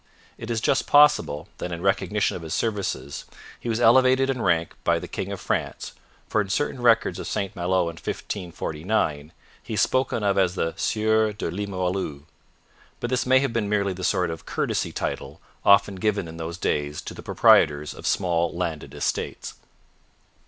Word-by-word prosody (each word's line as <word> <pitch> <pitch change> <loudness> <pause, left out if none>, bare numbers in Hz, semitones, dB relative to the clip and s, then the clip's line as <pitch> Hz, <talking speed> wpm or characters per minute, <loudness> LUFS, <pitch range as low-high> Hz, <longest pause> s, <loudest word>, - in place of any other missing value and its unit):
It 115 - -9
is 115 -2 -1
just 130 - +1
possible 145 - +4
that 90 - -4
in 85 +1 -5
recognition 95 +1 +1
of - - -6
his 80 -1 -4
services 95 - -2 0.3
he 120 - -5
was 115 0 0
elevated 130 +3 +5
in 125 -3 -3
rank 85 -4 +1
by - - +3
the - - -6
king - - -4
of - - -5
France, - - -3 0.4
for 110 - +1
in 100 - -5
certain 135 +4 -1
records 115 -2 +3
of - - -5
St 100 -2 -3
Malo 90 +1 +1
in 85 -1 -3
1549, 80 -4 -3 0.3
he - - -5
is - - 0
spoken 130 -4 +1
of 100 -1 +2
as 90 -1 +2
the 80 -3 -1
Sieur 110 0 +1
de 100 -5 -4
Limoilou. 95 -6 -3 0.8
But 120 - -3
this 125 0 0
may 130 0 +5
have 140 -4 -1
been 110 -3 -1
merely 100 -2 +1
the 90 0 -8
sort 90 -1 +1
of 80 - -8
courtesy - - -1
title - - -4 0.2
often 100 -1 +5
given 100 -2 0
in 80 0 -9
those 85 +1 -5
days 75 -3 -1
to - - -7
the - - -9
proprietors 75 0 +4
of - - -7
small 85 -2 +1
landed 85 -4 -4
estates. - - -3
95 Hz, 180 wpm, -24 LUFS, 85-110 Hz, 0.8 s, elevated